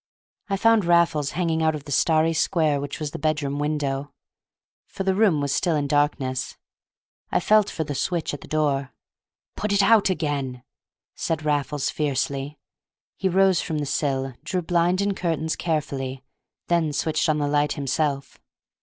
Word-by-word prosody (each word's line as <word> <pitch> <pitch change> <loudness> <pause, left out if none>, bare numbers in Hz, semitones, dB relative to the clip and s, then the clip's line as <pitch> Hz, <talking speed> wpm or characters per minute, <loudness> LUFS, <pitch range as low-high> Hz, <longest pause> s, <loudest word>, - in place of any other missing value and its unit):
I 195 - 0
found 225 0 +4
Raffles 170 -4 +2
hanging 165 -2 0
out 160 -1 +2
of 150 - -7
the 145 - -9
starry 160 +3 +3
square 155 -3 +1
which 145 +2 -5
was 150 -2 -3
the - - -6
bedroom 150 -2 -1
window, 145 -2 -2 0.8
for 195 - -5
the 190 0 +2
room 190 -7 +3
was 140 -1 0
still 170 +2 +1
in 145 -1 0
darkness. 140 -3 0 0.7
I - - +2
felt 215 +3 +4
for 160 - -3
the 145 - -4
switch 165 +3 -1
at 145 - -6
the - - -11
door. 140 -3 0 0.6
"Put 210 - -2
it 200 0 +4
out 210 -1 +5
again!" 140 -8 -2 0.5
said 160 -2 -3
Raffles 145 -1 0
fiercely. 140 0 -2 0.6
He 190 - 0
rose 190 -1 +3
from 160 - -3
the 150 - -2
sill, 135 -2 -1
drew 185 -1 -2
blind 175 +2 +2
and 200 0 0
curtains 160 -3 -1
carefully, 135 -5 -3 0.4
then 165 -3 +1
switched 160 +2 0
on 155 - +2
the 145 -1 0
light 145 0 +1
himself. 140 -1 -2
155 Hz, 165 wpm, -24 LUFS, 145-170 Hz, 0.8 s, out